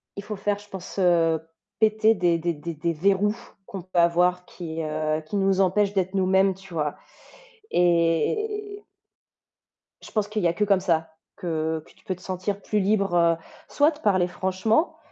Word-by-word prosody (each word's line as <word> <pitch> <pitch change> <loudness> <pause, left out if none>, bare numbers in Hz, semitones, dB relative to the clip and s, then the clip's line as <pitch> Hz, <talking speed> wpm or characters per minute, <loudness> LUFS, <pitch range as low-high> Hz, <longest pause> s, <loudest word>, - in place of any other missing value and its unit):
il 200 - -6
faut 210 - -5
faire 205 +1 -1
je 205 - -15
pense, 190 0 -8
heu, 165 -3 +3 0.4
péter 220 0 +4
des 175 -2 +2
des 170 +1 -1
des 165 +2 -6
des 165 +2 -2
verrous 200 +5 +2 0.3
qu'on 195 -3 -7
peut 180 -1 -1
avoir 180 +1 +3
qui, 165 -2 -6
heu, 155 0 -1
qui 205 - -5
nous 195 -1 +2
empêchent 200 +2 +2
d'être 190 0 -1
nous-mêmes, 190 0 +3
tu 195 -1 -14
vois 150 -3 -1 0.8
et 405 - +1 1.2
je - - -12
pense 210 -2 -1
qu'il 215 0 -2
y 175 - +3
a 165 - +2
que 210 - +1
comme 200 -2 +3
ça, 165 -3 0 0.3
que 160 -3 -2
que - - -19
tu - - -27
peux 185 - -3
te 180 - -19
sentir 190 +2 -3
plus 210 +1 0
libre, 195 -1 +1
heu, 170 -1 +4 0.3
soit 295 +2 +3
de 300 - -12
parler 185 - +2
franchement, 190 - 0
185 Hz, 185 wpm, -25 LUFS, 170-205 Hz, 1.2 s, péter